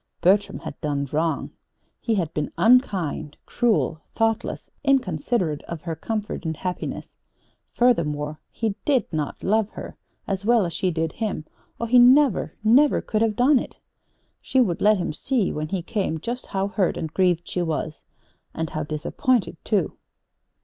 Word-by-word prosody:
Bertram 195 +4 +3
had - - -8
done 145 -3 -1
wrong. 160 +1 -1 0.5
He 230 - 0
had 170 -5 -1
been 150 -1 -2
unkind, 180 - +2
cruel, 220 -9 +1
thoughtless, 225 -1 -1
inconsiderate 185 - +1
of 170 -2 -7
her 165 -2 -3
comfort 215 +6 -4
and 160 -2 -3
happiness. 180 -1 -5 0.6
Furthermore 155 -11 +1
he 225 -3 -2
did 275 -4 +2
not 150 -2 -3
love 215 +1 +2
her - - -8 0.3
as 195 -2 -2
well 230 -2 +4
as 170 - -4
she 185 - 0
did 160 -1 -1
him 210 -8 -3 0.3
or 235 - -2
he 250 +2 +6
never, 255 0 +5
never 265 +7 +5
could 215 -1 -2
have 225 -2 +2
done 260 +4 +5
it! - - -8 0.6
She 265 - +1
would 190 -9 +2
let 210 0 +5
him 175 -3 -2
see, 230 - 0
when 155 0 -3
he 180 +1 -3
came, 190 -5 -2
just 240 +9 -5
how 195 +1 -1
hurt 200 -3 0
and 160 -1 -4
grieved 180 -3 +2
she 180 - -2
was 160 -2 -3 0.5
and 160 -1 -3
how 155 - -2
disappointed, 175 - 0
too. 205 -6 0
190 Hz, 160 wpm, -24 LUFS, 160-230 Hz, 0.6 s, he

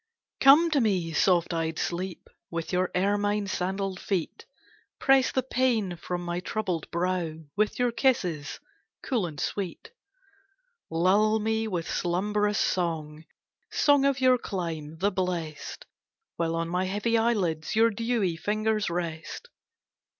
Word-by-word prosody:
Come 305 +5 +7
to 285 -3 +3
me 185 -7 0
soft 175 0 +3
eyed 165 -1 -2
sleep, 180 +1 -3 0.2
With 165 +1 -4
your 180 0 +1
ermine 205 +2 +1
sandalled 190 0 -2
feet; 185 -5 -3 0.5
Press 270 -1 +4
the 260 - 0
pain 240 -8 0
from 175 +1 -5
my 175 0 -2
troubled 180 -4 -3
brow 175 -2 -1 0.2
With 210 +1 +1
your 245 -1 +2
kisses 185 - 0 0.4
cool 230 -9 0
and 150 -3 -8
sweet; 200 - -4 1.0
Lull 200 +6 +3
me 220 +1 0
with 175 -6 -3
slumbrous 205 +4 0
song, 160 -3 -1 0.5
Song 285 -2 +4
of 275 -1 +2
your 255 -1 +4
clime, 165 -7 -4
the 200 +5 +1
blest, 175 -5 -4 0.5
While 165 -1 -1
on 165 0 -1
my 180 +2 0
heavy 210 +5 0
eyelids 200 -10 0
Your 225 +1 +5
dewy 225 -5 0
fingers 215 +2 0
rest. 170 - -5
190 Hz, 130 wpm, -27 LUFS, 170-220 Hz, 1.0 s, Come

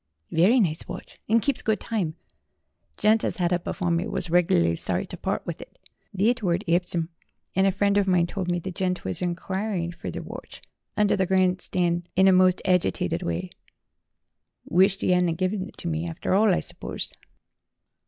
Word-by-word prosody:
"Very 195 +10 +4
nice 165 -7 0
watch, - - -9
and 225 +1 +3
keeps 280 -3 0
good 220 -3 0
time. 185 -9 -2 0.8
Gent 215 +1 +3
as - - -2
had 175 -2 0
it 175 - 0
afore 175 -1 -1
me 170 +1 0
was 165 - -4
reg'lar 85 - +3
sorry - - 0
to - - -7
part - - -3
with - - -5
it. - - -13 0.4
Thet 230 +5 +2
were 175 -4 +2
at 185 - -5
Epsom, 170 -1 0 0.5
and 190 +1 +4
a - - +4
friend 200 +1 +2
of 200 - 0
mine 180 -2 +3
told 180 0 -4
me 175 - +1
the 185 +2 -5
gent 180 0 -2
were 95 - -1
inquirin' 180 - -2
fur 170 - -7
thet - - -6
watch - - -10 0.3
under 210 -1 +3
the 190 -1 0
gran' 185 -1 +2
stan' 175 -1 -1
in 190 +1 +5
a - - +7
most 185 0 +4
agitited 180 - +1
wye. 85 +2 -3 1.1
Wished 190 +2 +3
'e 180 - +3
'adn't 175 -2 +2
give 185 +2 0
it 190 -3 -6
me, 165 0 -2
arter 165 +2 -2
all, 210 +2 +4
I 180 - +2
surpose." - - -2
180 Hz, 190 wpm, -25 LUFS, 170-195 Hz, 1.1 s, a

